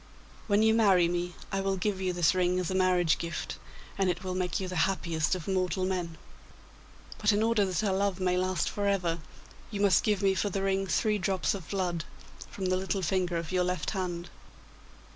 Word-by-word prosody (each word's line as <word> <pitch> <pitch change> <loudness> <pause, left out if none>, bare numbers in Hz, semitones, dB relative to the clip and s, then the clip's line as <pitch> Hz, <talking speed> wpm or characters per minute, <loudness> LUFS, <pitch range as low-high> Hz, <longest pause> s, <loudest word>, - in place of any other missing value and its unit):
When 205 0 +3
you 220 0 +5
marry 195 -6 +5
me, 175 0 -2 0.2
I 195 -1 0
will 195 0 0
give 190 0 -1
you 185 -1 0
this 175 -2 +3
ring 180 0 +1
as 180 0 -2
a - - -1
marriage 180 -3 +3
gift, 170 0 -4 0.4
and 190 -1 +3
it 175 +1 -2
will 185 -1 -3
make 180 -2 -1
you 190 - -3
the 180 - -5
happiest 170 -3 -1
of 180 - -7
mortal 185 -1 0
men. 175 -3 -3 1.0
But 210 0 +3
in 210 +1 +2
order 225 -3 +3
that 185 +3 -1
our 200 -3 +1
love 195 -1 0
may 180 -1 +1
last 185 -2 0
for 205 -1 -2
ever, 180 -4 0 0.5
you 205 - -5
must 200 -4 +4
give 210 -2 +1
me 195 -1 +4
for 205 +2 0
the 195 0 -2
ring 195 0 0
three 210 +3 +1
drops 190 0 0
of 190 -5 -7
blood 180 -4 -1 0.5
from 190 - -5
the 185 0 +2
little 190 +1 -2
finger 180 0 0
of 165 +1 -4
your 180 -1 +2
left 180 0 -2
hand. 175 -3 -4
185 Hz, 210 wpm, -29 LUFS, 180-195 Hz, 1.0 s, you